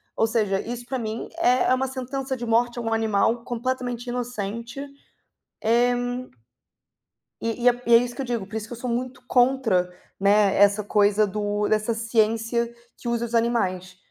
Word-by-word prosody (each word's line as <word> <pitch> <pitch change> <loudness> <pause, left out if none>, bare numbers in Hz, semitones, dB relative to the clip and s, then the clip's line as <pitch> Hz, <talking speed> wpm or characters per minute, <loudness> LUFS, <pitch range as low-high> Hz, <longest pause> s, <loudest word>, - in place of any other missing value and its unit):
Ou 225 - +2
seja, 215 -4 +1
isso 240 +1 -6
para 260 +1 -3
mim 220 0 -4
é 250 -6 +3
é - - +6
uma 265 +1 -1
sentença 265 +1 -4
de 240 - -5
morte 240 +1 +1
a - - -2
um 225 -1 -1
animal 225 +1 +1
completamente 245 0 -3
inocente. 235 0 -4 0.8
Eh, 240 +2 +3 1.5
e 230 +1 -3
e - - +8
é 245 0 +1
e 235 - +6
é - - +10
isso 245 0 -3
que 275 - -3
eu - - -5
digo, 235 -5 -2
por 215 +3 -7
isso 220 -1 -4
que - - -10
eu - - -9
sou 250 - -1
muito 250 +2 -3
contra, 245 -8 +3 0.3
né, 200 0 +4
essa 205 +1 +4
coisa 205 +1 +3
do 205 +1 -1
dessa 215 +2 +1
ciência 225 +1 +1 0.3
que 240 - -7
usa 235 0 0
os 235 - -9
animais. 185 -6 0
235 Hz, 185 wpm, -24 LUFS, 215-245 Hz, 1.5 s, é